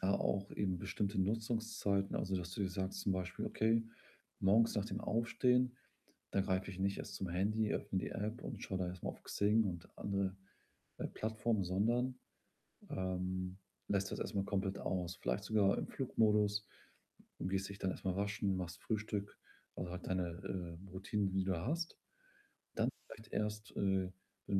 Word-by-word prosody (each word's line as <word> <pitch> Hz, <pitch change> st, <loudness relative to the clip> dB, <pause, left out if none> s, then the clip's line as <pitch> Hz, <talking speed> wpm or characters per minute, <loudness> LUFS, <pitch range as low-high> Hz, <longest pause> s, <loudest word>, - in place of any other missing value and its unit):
da 95 Hz, -, +3 dB
auch 100 Hz, 0 st, +1 dB
eben 95 Hz, -3 st, 0 dB
bestimmte 100 Hz, +3 st, -1 dB
Nutzungszeiten, 110 Hz, -1 st, +1 dB
also 95 Hz, 0 st, 0 dB
das 90 Hz, 0 st, -4 dB
du 100 Hz, -, -1 dB
dir 95 Hz, -, +2 dB
sagst 95 Hz, +1 st, -2 dB
zum 100 Hz, -, +2 dB
Beispiel: 90 Hz, -1 st, -2 dB
„Okay, 115 Hz, +1 st, +3 dB, 0.6 s
morgens 110 Hz, +4 st, +5 dB
nach 105 Hz, -3 st, +1 dB
dem -, -, -3 dB
Aufstehen, 125 Hz, +2 st, +3 dB, 0.6 s
da 100 Hz, -, +3 dB
greife 95 Hz, 0 st, 0 dB
ich 95 Hz, -, -8 dB
nicht 100 Hz, +1 st, +2 dB
erst -, -, -5 dB
zum 95 Hz, -, -2 dB
Handy, 105 Hz, +5 st, +2 dB
öffne 100 Hz, -2 st, 0 dB
die -, -, -2 dB
App 110 Hz, +4 st, -2 dB
und 115 Hz, -6 st, -5 dB
schaue 95 Hz, -, -2 dB
da 90 Hz, -, +1 dB
erstmal 90 Hz, 0 st, -3 dB
auf -, -, -18 dB
Xing 105 Hz, +2 st, +4 dB
und 85 Hz, -3 st, -3 dB
andere, 100 Hz, -1 st, 0 dB, 0.6 s
äh, -, -, -1 dB
Plattformen”, 110 Hz, -1 st, 0 dB
sondern, 120 Hz, +8 st, +2 dB, 0.7 s
ähm, 95 Hz, 0 st, -1 dB, 0.3 s
lässt 100 Hz, -1 st, +1 dB
das -, -, -2 dB
erstmal 100 Hz, -1 st, 0 dB
komplett 95 Hz, 0 st, 0 dB
aus. 90 Hz, -1 st, -1 dB
Vielleicht 60 Hz, 0 st, -1 dB
sogar 100 Hz, -2 st, +4 dB
im -, -, -2 dB
Flugmodus, 105 Hz, -5 st, +3 dB, 0.7 s
du -, -, -2 dB
gehst 95 Hz, 0 st, 0 dB
dich 100 Hz, 0 st, -7 dB
dann 95 Hz, -, +1 dB
erstmal 95 Hz, 0 st, -1 dB
waschen, 100 Hz, -1 st, +1 dB
machst 90 Hz, -1 st, -4 dB
Frühstück, 105 Hz, -2 st, -2 dB, 0.4 s
also 90 Hz, -, -3 dB
halt 90 Hz, 0 st, -5 dB
deine, 95 Hz, -1 st, +1 dB, 0.6 s
äh, 95 Hz, -, -11 dB
Routinen, 100 Hz, +2 st, 0 dB
die 95 Hz, 0 st, +1 dB
du 95 Hz, -, +2 dB
da 85 Hz, 0 st, -2 dB
hast. 165 Hz, +4 st, -1 dB, 0.8 s
Dann -, -, +3 dB, 0.2 s
vielleicht 110 Hz, 0 st, -11 dB
erst, 105 Hz, -1 st, -1 dB
äh, 95 Hz, -2 st, +2 dB, 0.4 s
wenn 95 Hz, -, +3 dB
100 Hz, 170 wpm, -37 LUFS, 95-110 Hz, 0.8 s, morgens